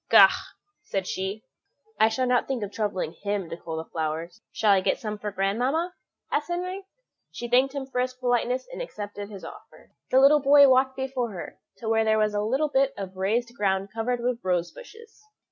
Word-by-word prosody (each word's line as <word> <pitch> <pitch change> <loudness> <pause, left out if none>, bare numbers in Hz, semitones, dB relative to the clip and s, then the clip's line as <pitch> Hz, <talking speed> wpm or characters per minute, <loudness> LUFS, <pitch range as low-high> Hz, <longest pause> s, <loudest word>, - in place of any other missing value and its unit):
"Faugh!" - - +9 0.5
said 195 -1 -3
she, 190 +4 -4 0.6
"I 220 - +6
shall 255 +3 0
not 250 -1 +2
think 260 -5 -2
of 200 - -5
troubling 200 -6 -2
him 200 -4 -2
to - - -3
cull 165 -1 -6
the 160 - -4
flowers." 165 +6 -4
"Shall 215 -2 +2
I 195 -1 +5
get - - +1
some 215 -2 -5
for 210 - -3
grandmamma?" 245 - 0 0.4
asked 295 - 0
Henry. 365 +2 -4 0.4
She 240 - -6
thanked 260 +3 +3
him 275 -1 -3
for 255 -2 -2
his 255 0 -2
politeness, 250 0 0
and - - -5
accepted 205 - -6
his 200 -3 -9
offer. - - -13 0.2
The 260 - +5
little 285 +3 +7
boy 285 +1 +7
walked 260 0 +3
before 265 -2 -2
her 175 - -8 0.2
to 230 - -7
where 225 0 +3
there 220 0 +3
was 215 -1 +2
a 205 - 0 0.3
bit 270 0 +2
of 190 -1 -6
raised 230 +6 0
ground 195 -2 0
covered 235 +2 -1
with 245 0 -2
rose 175 -2 0
bushes. 460 -3 -14
225 Hz, 195 wpm, -26 LUFS, 200-265 Hz, 0.6 s, Faugh